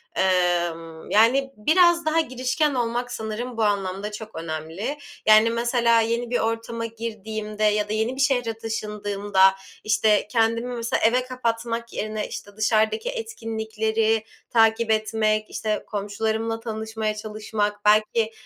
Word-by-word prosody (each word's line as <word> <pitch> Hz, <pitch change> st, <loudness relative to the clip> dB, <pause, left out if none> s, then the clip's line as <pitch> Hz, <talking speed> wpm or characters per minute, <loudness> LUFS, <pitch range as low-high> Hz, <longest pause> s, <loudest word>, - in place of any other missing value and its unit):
Emm, 175 Hz, -3 st, 0 dB
yani, 260 Hz, +6 st, +4 dB
biraz 340 Hz, +8 st, +4 dB
daha 315 Hz, +1 st, +2 dB
girişken 260 Hz, +1 st, 0 dB
olmak 245 Hz, 0 st, -1 dB
sanırım 225 Hz, +2 st, -5 dB
bu 225 Hz, -, +1 dB
anlamda 200 Hz, 0 st, -1 dB
çok 215 Hz, +1 st, -9 dB
önemli. 165 Hz, -, -4 dB, 0.3 s
Yani, 215 Hz, +1 st, +7 dB
mesela 235 Hz, 0 st, +2 dB
yeni 235 Hz, +1 st, -1 dB
bir 245 Hz, -, +1 dB
ortama 230 Hz, +1 st, -2 dB
girdiğimde 215 Hz, -2 st, -5 dB
ya 210 Hz, 0 st, +2 dB
da 215 Hz, -, -1 dB
yeni 220 Hz, +4 st, 0 dB
bir 270 Hz, -, -2 dB
şehre 245 Hz, -5 st, +1 dB
taşındığımda, 205 Hz, -3 st, +1 dB, 0.3 s
işte, 210 Hz, 0 st, +2 dB
kendimi 230 Hz, +1 st, +1 dB
mesela 230 Hz, -1 st, -1 dB
eve 245 Hz, +3 st, +3 dB
kapatmak 235 Hz, -2 st, -3 dB
yerine, 215 Hz, 0 st, -3 dB
işte, 205 Hz, 0 st, -9 dB
dışarıdaki 220 Hz, -, +1 dB
etkinlikleri 220 Hz, -, -1 dB, 0.3 s
takip 225 Hz, 0 st, +3 dB
etmek, 215 Hz, 0 st, +1 dB
işte, 215 Hz, -1 st, -2 dB
komşularımla 220 Hz, +2 st, -2 dB
tanışmaya 220 Hz, -1 st, -3 dB
çalışmak, 210 Hz, -1 st, -3 dB
belki, 215 Hz, +1 st, +3 dB
220 Hz, 125 wpm, -24 LUFS, 210-235 Hz, 0.3 s, Yani